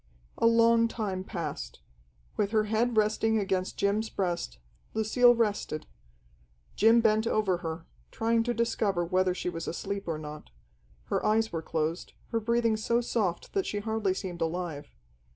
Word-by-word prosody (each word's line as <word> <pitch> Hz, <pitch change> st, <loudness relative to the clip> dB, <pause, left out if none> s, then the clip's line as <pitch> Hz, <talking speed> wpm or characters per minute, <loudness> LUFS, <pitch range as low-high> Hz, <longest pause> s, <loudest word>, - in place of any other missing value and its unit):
A -, -, +5 dB
long 230 Hz, 0 st, +5 dB
time 200 Hz, -5 st, -3 dB
passed. 165 Hz, -6 st, -5 dB, 0.6 s
With 205 Hz, -2 st, 0 dB
her 215 Hz, 0 st, +2 dB
head 220 Hz, +2 st, 0 dB
resting 220 Hz, +1 st, +2 dB
against 190 Hz, -2 st, -1 dB
Jim's 210 Hz, +2 st, +1 dB
breast, 175 Hz, -, -2 dB, 0.4 s
Lucille 240 Hz, +3 st, +5 dB
rested. 210 Hz, -9 st, -1 dB, 0.9 s
Jim 225 Hz, +2 st, +5 dB
bent 220 Hz, 0 st, +3 dB
over 205 Hz, -5 st, +1 dB
her, 165 Hz, -1 st, -5 dB, 0.2 s
trying 230 Hz, 0 st, +1 dB
to 240 Hz, -, 0 dB
discover 205 Hz, -6 st, 0 dB
whether 185 Hz, +1 st, +1 dB
she -, -, -4 dB
was 165 Hz, -2 st, -4 dB
asleep 195 Hz, +3 st, -4 dB
or 165 Hz, -2 st, -1 dB
not. 150 Hz, -, -9 dB, 0.5 s
Her -, -, -2 dB
eyes 220 Hz, +1 st, +2 dB
were 165 Hz, -, -2 dB
closed, 160 Hz, +1 st, -3 dB, 0.2 s
her 230 Hz, -, +1 dB
breathing 230 Hz, 0 st, +1 dB
so 235 Hz, +2 st, +1 dB
soft 210 Hz, -7 st, -2 dB
that 390 Hz, -2 st, 0 dB
she 205 Hz, -, -2 dB
hardly 210 Hz, -2 st, -1 dB
seemed 180 Hz, -3 st, -5 dB
alive. 165 Hz, -3 st, -3 dB
210 Hz, 150 wpm, -29 LUFS, 175-225 Hz, 0.9 s, A